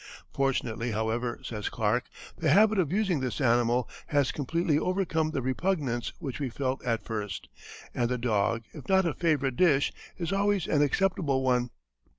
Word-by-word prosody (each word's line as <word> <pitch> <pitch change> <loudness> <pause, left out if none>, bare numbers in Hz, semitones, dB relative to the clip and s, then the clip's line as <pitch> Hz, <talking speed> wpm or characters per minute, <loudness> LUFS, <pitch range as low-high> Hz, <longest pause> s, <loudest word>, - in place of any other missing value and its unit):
"Fortunately, 120 -4 -1
however," 115 +3 -1
says 105 -3 -4
Clark, 115 +2 0 0.3
"the 160 - 0
habit 210 +6 +5
of 165 -5 +1
using 195 -5 +1
this 130 +1 -3
animal 120 -1 +2 0.2
has 145 -3 +2
completely 155 +2 0
overcome 170 -3 0
the 140 -5 -2
repugnance 130 -3 -1
which 135 -2 -5
we 140 -3 -2
felt 130 +2 -2
at 115 -2 -1
first, 105 -4 -5 0.4
and 120 -1 0
the 125 - 0
dog, 115 -1 0
if 150 - -11
not 190 -1 +4
a 165 - 0
favorite 145 -7 0
dish, 150 -6 +3 0.2
is 175 +1 -2
always 200 -2 +1
an 145 - +2
acceptable 145 -3 +1
one." 125 -1 +2
135 Hz, 160 wpm, -28 LUFS, 120-165 Hz, 0.4 s, habit